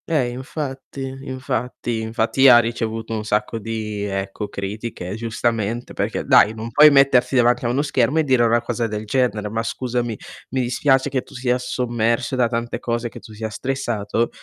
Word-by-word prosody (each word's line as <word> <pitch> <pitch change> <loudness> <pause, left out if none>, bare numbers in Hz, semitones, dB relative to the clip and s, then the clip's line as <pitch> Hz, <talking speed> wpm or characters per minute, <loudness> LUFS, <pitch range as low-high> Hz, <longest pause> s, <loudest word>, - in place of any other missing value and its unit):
Ehm, 140 -7 +1
infatti. 135 0 -6 0.2
Infatti, 125 -3 -3
infatti 115 +4 +2
ha 120 - +9
ricevuto 115 -1 -1
un 110 -1 -2
sacco 105 +1 -1
di, 110 -2 -4
ecco, 95 +1 -3
critiche 100 -1 -5
giustamente 115 0 -2
perché, - - -2
dai 110 +2 +5
non 115 +1 -6
puoi 150 +6 +8
mettersi 135 -2 +4
davanti 120 0 +3
a - - +1
uno 135 +4 +1
schermo 135 0 +1
e 160 - +4
dire 130 -4 +3
una 120 0 +3
cosa 120 0 -2
del 105 0 -5
genere. 110 -3 0
Ma 110 +2 -2
scusami, 120 -1 -2 0.3
mi 130 0 -1
dispiace 130 +3 +2
che 130 -2 -1
tu - - -17
sia 125 0 +1
sommerso 120 0 -1
da 125 -2 +3
tante 115 0 -3
cose, 120 0 -2
che - - -11
tu - - -14
sia 110 +1 -4
stressato, 115 -2 -2
120 Hz, 175 wpm, -21 LUFS, 110-130 Hz, 0.3 s, ha